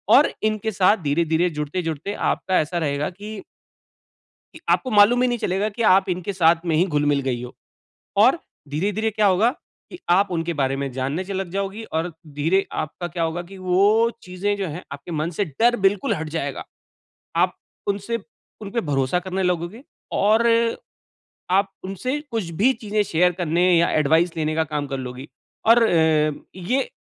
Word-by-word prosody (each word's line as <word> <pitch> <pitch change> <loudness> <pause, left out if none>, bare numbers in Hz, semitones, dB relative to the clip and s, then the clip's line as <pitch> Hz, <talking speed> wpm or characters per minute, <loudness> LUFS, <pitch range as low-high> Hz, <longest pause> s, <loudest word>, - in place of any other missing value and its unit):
और - - +5
इनके 215 0 0
साथ 195 +2 +4
धीरे-धीरे 165 +4 +1
जुड़ते-जुड़ते 160 +3 -3
आपका 185 -1 +1
ऐसा 160 +3 -2
रहेगा 145 -3 -1
कि 205 +3 -8 1.1
कि - - -12
आपको 255 - +2
मालूम 215 +4 +6
भी 255 - +3
नहीं 240 -1 0
चलेगा 200 +2 -1
कि 235 - -2
आप 190 0 +3
इनके 180 +2 -2
साथ 170 -1 +3
में 165 -2 +1
ही 175 +4 +4
घुल-मिल 145 -4 +1
गई 120 -2 -1
हो, 125 - -9 0.6
और 240 +11 +5 0.3
धीरे-धीरे 205 +9 -1
क्या 215 0 +2
होगा, 200 +5 +4 0.4
कि 360 - -9
आप 195 +3 +4
उनके 170 -1 -1
बारे 135 -2 0
में 140 0 -3
जानने 135 +8 -2
च 195 - -11
लग 190 -2 -2
जाओगी 195 +3 -3 0.2
और 170 +2 -1 0.3
धीरे 175 +7 +2
आपका 155 +3 -5
क्या 170 0 -3
होगा 165 +2 -1
कि 190 +3 -12
वो 200 +5 +3
चीज़ें 190 +3 -2
जो 195 - -2
हैं 165 +4 -6
आपके 140 +4 -9
मन 155 +2 -1
से 205 - +1
डर 230 - +2
बिल्कुल 195 0 +2
हट 160 0 -4
जाएगा। 145 -4 -3 0.7
आप 180 +2 +2 0.3
उनसे 200 +3 -1 0.4
उनपे 210 +3 -2
भरोसा 135 +4 +1
करने 185 +1 -3
लगोगे 180 +6 -2 0.3
और 220 +3 +3 1.0
आप 195 +1 +3
उनसे 250 +10 -3
कुछ 215 -7 -2
भी 260 +4 +6
चीज़ें 210 0 0
शेयर 180 -1 +2
करने 170 0 +1
या 170 - +3
एडवाइस 160 +4 +2
लेने 155 0 -1
का 160 - +2
काम 150 -2 -3
कर 135 -1 -3
लोगी 130 +1 -7 0.4
और 230 +1 +7
अ, 160 -5 +3 0.2
ये 245 +9 -1
180 Hz, 175 wpm, -22 LUFS, 155-205 Hz, 1.1 s, और